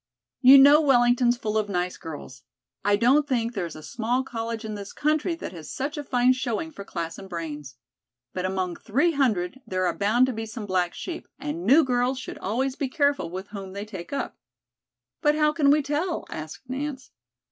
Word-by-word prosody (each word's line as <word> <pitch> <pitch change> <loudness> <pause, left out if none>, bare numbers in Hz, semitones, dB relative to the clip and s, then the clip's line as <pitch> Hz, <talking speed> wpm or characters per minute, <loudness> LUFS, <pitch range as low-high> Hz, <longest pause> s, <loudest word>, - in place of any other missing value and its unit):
"You 265 +1 +10
know 285 +3 +8
Wellington's 245 -3 +4
full 220 -2 -1
of 210 -1 -3
nice 180 -1 -1
girls. 145 -5 -9 0.4
I 205 0 +4
don't 260 +7 +3
think 240 -3 0
there 190 -6 -2
is 165 - -10
a 155 - -10
small 240 +7 -1
college 230 -2 -4
in 215 - -4
this 200 -1 -7
country 310 +3 0
that 330 - -7
has 165 -4 -9
such 280 +4 -3
a 295 - -4
fine 250 -2 +3
showing 255 +5 -3
for 200 - -9
class 165 -3 -5
and 195 -1 -10
brains. 150 -6 -6 0.6
But 180 - -3
among 185 -2 -2
three 280 +11 +1
hundred 250 - 0
there 185 0 0
are - - 0
bound 220 +5 +3
to 260 - -2
be 225 0 -5
some 220 0 -6
black 180 -3 0
sheep, 350 - -6
and 165 +6 -4
new 290 +7 +7
girls 250 0 +1
should 260 - -7
always 255 +6 -1
be 275 -2 -2
careful 285 - +1
with 190 +3 -7
whom 195 -2 -7
they 200 +1 -5
take 190 -5 -8
up." 280 - -4 0.8
"But 295 -1 +3
how 300 0 +3
can 295 -3 +3
we 295 +1 +4
tell?" 305 +5 -2
asked 155 +11 -7
Nance. 265 0 -5
240 Hz, 200 wpm, -25 LUFS, 190-275 Hz, 0.8 s, You